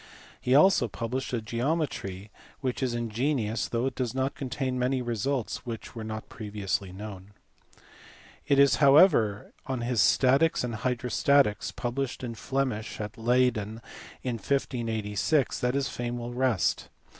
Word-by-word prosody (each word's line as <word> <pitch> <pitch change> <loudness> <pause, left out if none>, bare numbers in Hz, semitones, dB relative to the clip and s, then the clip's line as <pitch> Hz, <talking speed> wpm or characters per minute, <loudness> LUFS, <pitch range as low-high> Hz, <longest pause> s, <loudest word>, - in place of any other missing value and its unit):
He 125 - +2
also 155 -4 +5
published 120 +4 -4
a 120 -3 -2
geometry 115 - -2 0.3
which 130 -2 -2
is 125 -2 0
ingenious 120 0 -1
though 115 +1 -1
it 135 - -1
does 125 -1 -3
not 130 +1 0
contain 130 -1 -3
many 130 +1 +1
results 120 +1 -2
which 115 -2 -7
were 115 - -6
not 110 0 -6
previously 100 -3 -3
known. 100 0 -9 1.1
It 140 -2 +3
is 140 0 +5
however 135 - +5
on 130 -2 -2
his 120 -1 +1
Statics 135 +5 +4
and 120 -1 -3
Hydrostatics 125 +1 +1
published 125 +1 -3
(in 120 -2 -4
Flemish) 130 -3 -2
at 105 0 -5
Leyden 115 -2 +1 0.4
in 125 -2 -2
1586 115 0 0
that 125 +1 0
his 140 -1 +1
fame 120 0 -4
will 120 0 -5
rest. 125 -7 +1
120 Hz, 140 wpm, -28 LUFS, 110-135 Hz, 1.1 s, also